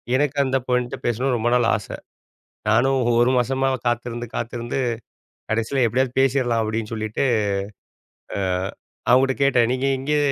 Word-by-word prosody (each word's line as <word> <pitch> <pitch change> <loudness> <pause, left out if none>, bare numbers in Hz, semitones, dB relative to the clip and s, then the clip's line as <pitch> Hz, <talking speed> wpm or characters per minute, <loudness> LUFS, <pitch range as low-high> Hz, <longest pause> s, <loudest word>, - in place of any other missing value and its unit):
எனக்கு 145 +1 0
அந்த 130 0 +1
பெண்ணுட்ட 125 +1 0
பேசணுன்னு 125 +2 +1
ரொம்ப 120 +2 0
நாள் 120 -2 +3
ஆச. 100 - -5 0.8
நானும் 130 +5 +3 0.2
1 120 +1 +4
மாசமா 135 +2 +1 0.2
காத்திருந்து 120 0 -2
காத்திருந்து 120 +2 -3 0.7
கடைசில 115 +4 +1
எப்பிடியாவது 130 +2 -1
பேசிர்லாம் 130 -3 +2
அப்பிடின்னு 110 0 -3
சொல்லிட்டு, 110 +3 -2 1.8
அ - - +6
அவுங்ககிட்ட 130 +1 +4
கேட்டேன். 125 -4 +4
'நீங்க 130 +1 0
இங்கே 150 +3 0
125 Hz, 130 wpm, -22 LUFS, 115-135 Hz, 1.8 s, அ